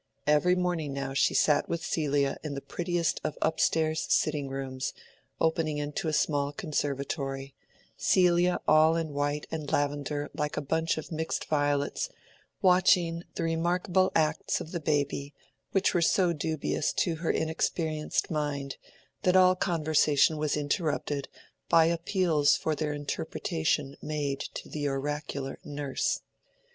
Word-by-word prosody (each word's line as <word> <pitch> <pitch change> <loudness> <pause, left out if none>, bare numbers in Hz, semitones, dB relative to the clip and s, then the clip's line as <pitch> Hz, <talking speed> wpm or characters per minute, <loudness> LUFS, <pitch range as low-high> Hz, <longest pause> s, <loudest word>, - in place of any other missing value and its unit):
Every 150 +5 +4
morning 175 -5 -1
now 135 -1 -3
she 140 - +2
sat 150 -1 +3
with 170 -1 -2
Celia 145 -3 0
in 150 -2 -4
the - - -3
prettiest 175 0 -1
of 155 -1 -3
up 160 0 0
stairs 160 0 +1
sitting 145 -3 +1
rooms, 135 -1 -4 0.5
opening 160 -2 +1
into 150 +4 -3
a - - +1
small 145 -2 +1
conservatory—Celia 145 +4 -1
all 155 +1 +6
in 165 -1 -1
white 145 +1 -1
and 155 -3 -4
lavender 145 0 -1
like 150 0 -3
a - - 0
bunch 160 +3 0
of 155 - -6
mixed 160 0 -2
violets, 145 - 0 0.5
watching 180 -2 +4
the - - -2
remarkable 175 +3 +1
acts 155 -1 +1
of 160 - -8
the 170 - -2
baby, 145 -2 -1 0.4
which 195 0 +2
were 175 - +2
so 175 +1 +3
dubious 155 0 -1
to 170 -3 0
her 165 0 -3
inexperienced 160 -1 -1
mind 145 -3 -2 0.4
that 180 0 +2
all 185 0 +6
conversation 155 -4 +2
was 150 0 0
interrupted 145 -1 -1 0.4
by 165 -1 +6
appeals 170 -3 +2
for 160 - -1
their 150 0 -2
interpretation 140 - -2
made 145 -2 -2 0.2
to - - -6
the 145 -1 -3
oracular 140 0 -3
nurse. 145 -2 -2
155 Hz, 135 wpm, -29 LUFS, 145-165 Hz, 0.5 s, all